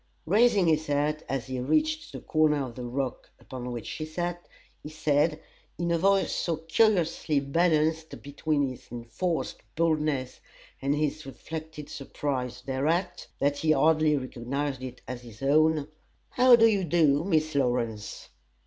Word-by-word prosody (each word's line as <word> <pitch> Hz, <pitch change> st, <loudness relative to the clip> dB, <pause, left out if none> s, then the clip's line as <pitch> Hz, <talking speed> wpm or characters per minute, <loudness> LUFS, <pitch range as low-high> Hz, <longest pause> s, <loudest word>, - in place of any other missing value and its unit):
Raising 205 Hz, +1 st, +4 dB
his 155 Hz, -1 st, +2 dB
hat 145 Hz, +1 st, 0 dB
as 135 Hz, -3 st, -2 dB
he 130 Hz, -1 st, -4 dB
reached 310 Hz, -, 0 dB
the -, -, -8 dB
corner 150 Hz, -3 st, +2 dB
of 125 Hz, -, -8 dB
the 125 Hz, -, -7 dB
rock 130 Hz, +1 st, -4 dB
upon 125 Hz, -1 st, -7 dB
which 120 Hz, -2 st, -5 dB
she 155 Hz, -, -5 dB
sat, 175 Hz, +2 st, -4 dB, 0.3 s
he 150 Hz, -, -8 dB
said, 155 Hz, 0 st, +1 dB, 0.4 s
in 170 Hz, +1 st, -1 dB
a 170 Hz, -, +2 dB
voice 195 Hz, +2 st, +3 dB
so 165 Hz, -2 st, -1 dB
curiously 165 Hz, -3 st, +2 dB
balanced 160 Hz, +2 st, +1 dB
between 145 Hz, 0 st, 0 dB
his 130 Hz, -1 st, -9 dB
enforced 120 Hz, +9 st, -3 dB
boldness 155 Hz, -5 st, 0 dB, 0.4 s
and 140 Hz, +2 st, +1 dB
his 150 Hz, -1 st, -2 dB
reflected 155 Hz, +2 st, -7 dB
surprise 135 Hz, -4 st, -4 dB
thereat, 155 Hz, +8 st, -1 dB
that 145 Hz, +1 st, +1 dB
he 155 Hz, -1 st, +3 dB
hardly 155 Hz, +1 st, +3 dB
recognized 130 Hz, +2 st, -3 dB
it 130 Hz, -1 st, -8 dB
as 125 Hz, -1 st, -6 dB
his 115 Hz, -1 st, -12 dB
own: 155 Hz, +1 st, +3 dB, 0.4 s
"How 250 Hz, 0 st, +7 dB
do 225 Hz, -1 st, +5 dB
you 205 Hz, -4 st, +3 dB
do, 155 Hz, -3 st, +3 dB
Miss 155 Hz, -4 st, +1 dB
Lawrence?" 120 Hz, -6 st, -2 dB
150 Hz, 150 wpm, -27 LUFS, 135-165 Hz, 0.4 s, How